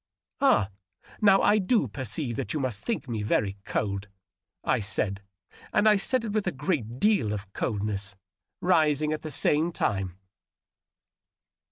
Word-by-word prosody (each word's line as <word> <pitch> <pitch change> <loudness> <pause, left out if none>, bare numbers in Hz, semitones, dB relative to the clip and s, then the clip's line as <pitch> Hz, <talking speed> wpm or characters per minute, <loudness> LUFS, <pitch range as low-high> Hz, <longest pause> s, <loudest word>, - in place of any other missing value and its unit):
" - - -63
Ah, 245 - +4 0.5
now 195 -2 +6
I 215 - +5
do 205 - +2
perceive 125 +1 -1
that - - -3
you - - 0
must 125 -6 -2
think 230 -10 -2
me 115 -3 -3
very 105 -1 0
cold," 100 -1 -2 0.6
I - - +2
said, 100 -1 -1 0.5
and 215 - +3
I 210 -1 +6
said 235 +4 0
it 215 - -3
with 215 -3 0
a - - +2
great 130 - -2
deal 205 - +3
of 100 -2 -7
coldness, 100 -3 -2 0.5
rising 155 -4 +3
at 155 - -4
the 155 - -6
same 155 +3 +2
time. 95 - -1
130 Hz, 155 wpm, -27 LUFS, -, 0.6 s, now